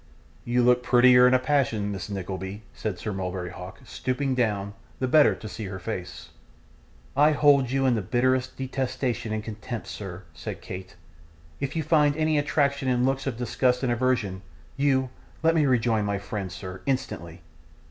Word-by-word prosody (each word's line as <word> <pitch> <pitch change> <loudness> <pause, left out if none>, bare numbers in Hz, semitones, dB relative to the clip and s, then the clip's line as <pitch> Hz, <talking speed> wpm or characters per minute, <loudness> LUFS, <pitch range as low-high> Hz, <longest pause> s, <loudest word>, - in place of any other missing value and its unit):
'You 120 +1 +2
look 125 0 +4
prettier 125 0 +6
in 125 - +5
a - - +7
passion, 125 -7 0
Miss 95 0 -5
Nickleby,' 95 +1 -5
said 105 -4 -4
Sir 105 - -4
Mulberry 90 -2 -4
Hawk, 90 +2 -9
stooping 130 +1 -2
down, 105 -5 0 0.2
the 130 - -1
better 150 +3 +5
to 110 - -9
see 110 +1 -6
her 95 -1 -5
face. 95 -1 -6 0.9
'I 150 +2 +5
hold 140 -3 +4
you 135 +1 +1
in 130 - +4
the 110 - 0
bitterest 130 +5 0
detestation 130 -3 -2
and 110 0 -2
contempt, 110 +2 -6
sir,' 95 -2 -7
said - - -6
Kate. 95 +1 -8 0.6
'If 140 - -3
you 160 - 0
find 150 -1 +3
any 155 -1 +2
attraction 140 -2 +1
in 125 0 +2
looks 135 +1 0
of 125 -4 -2
disgust 125 +2 +1
and 125 - +1
aversion, 120 -6 0 0.3
you 135 -2 +1 0.3
let 165 0 +5
me 155 -3 +3
rejoin 115 -4 +2
my 100 -1 -1
friends, 100 -2 -5
sir, 95 0 -8
instantly. 90 -10 -3
125 Hz, 170 wpm, -26 LUFS, 100-135 Hz, 0.9 s, a